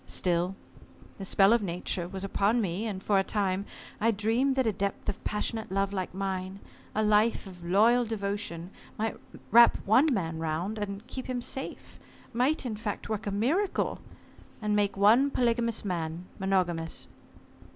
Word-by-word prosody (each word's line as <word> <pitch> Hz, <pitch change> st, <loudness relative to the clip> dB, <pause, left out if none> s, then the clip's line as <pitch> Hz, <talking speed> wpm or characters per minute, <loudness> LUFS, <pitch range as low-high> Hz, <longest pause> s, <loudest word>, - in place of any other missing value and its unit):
Still, 180 Hz, +1 st, 0 dB, 0.6 s
the 195 Hz, -, -5 dB
spell 195 Hz, +2 st, +5 dB
of 235 Hz, -, +3 dB
Nature 180 Hz, -1 st, -2 dB
was 190 Hz, +1 st, -6 dB
upon 200 Hz, +4 st, +1 dB
me, 200 Hz, +1 st, -1 dB
and 195 Hz, -3 st, -5 dB
for 200 Hz, -2 st, +3 dB
a -, -, +2 dB
time 195 Hz, -1 st, -1 dB, 0.3 s
I 225 Hz, -, +3 dB
dreamed 230 Hz, +6 st, +1 dB
that 260 Hz, -1 st, +2 dB
a 220 Hz, -, +3 dB
depth 200 Hz, 0 st, -3 dB
of -, -, -3 dB
passionate 220 Hz, 0 st, -2 dB
love 195 Hz, +1 st, 0 dB
like 185 Hz, -2 st, -3 dB
mine, 190 Hz, 0 st, -3 dB, 0.4 s
a 215 Hz, -, +2 dB
life 215 Hz, +2 st, +3 dB
of 180 Hz, -3 st, -11 dB
loyal 220 Hz, +8 st, +4 dB
devotion 200 Hz, -5 st, -4 dB, 0.3 s
might 220 Hz, 0 st, -1 dB, 0.4 s
wrap 235 Hz, +1 st, +7 dB
one 255 Hz, +9 st, +5 dB
man 165 Hz, -8 st, -1 dB
round, 165 Hz, +7 st, -2 dB
and 200 Hz, +1 st, -5 dB
keep 260 Hz, 0 st, -6 dB
him 255 Hz, -1 st, -2 dB
safe 265 Hz, +2 st, -6 dB, 0.3 s
might 260 Hz, +6 st, +1 dB
in 230 Hz, -3 st, -2 dB
fact, 210 Hz, -1 st, -5 dB
work 215 Hz, -2 st, -3 dB
a -, -, -1 dB
miracle 285 Hz, -, 0 dB, 0.6 s
and 210 Hz, -1 st, 0 dB
make 205 Hz, -1 st, +1 dB
one 225 Hz, +8 st, +5 dB
polygamous 235 Hz, -4 st, +1 dB
man 170 Hz, -2 st, -3 dB
monogamous. 175 Hz, -4 st, 0 dB
205 Hz, 160 wpm, -29 LUFS, 190-230 Hz, 0.6 s, wrap